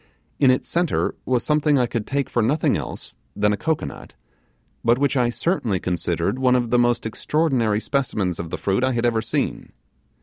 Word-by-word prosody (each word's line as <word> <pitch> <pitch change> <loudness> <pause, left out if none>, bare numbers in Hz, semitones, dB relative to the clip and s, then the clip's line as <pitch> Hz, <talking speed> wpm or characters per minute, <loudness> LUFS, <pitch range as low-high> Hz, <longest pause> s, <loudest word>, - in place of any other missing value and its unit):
In 135 - +5
its 130 - +2
centre 175 -1 0
was 125 -2 +1
something 150 -1 +2
I 125 - +3
could 115 -2 -4
take 140 -1 -1
for 120 - 0
nothing 135 +8 +2
else 65 - -6 0.2
than 105 0 +2
a - - +1
cocoanut, 155 - -4 0.7
but 115 +1 +4
which 140 +1 +1
I 125 -2 +2
certainly 120 - -1
considered 90 +8 -1
one 130 -1 +3
of 120 -2 0
the 125 - +4
most 120 -1 +2
extraordinary 120 -3 0
specimens 105 - -1
of 85 - -5
the - - -4
fruit 100 +5 0
I 130 0 +2
had 120 0 0
ever 115 -2 +2
seen. 110 - -3
120 Hz, 190 wpm, -22 LUFS, 110-140 Hz, 0.7 s, In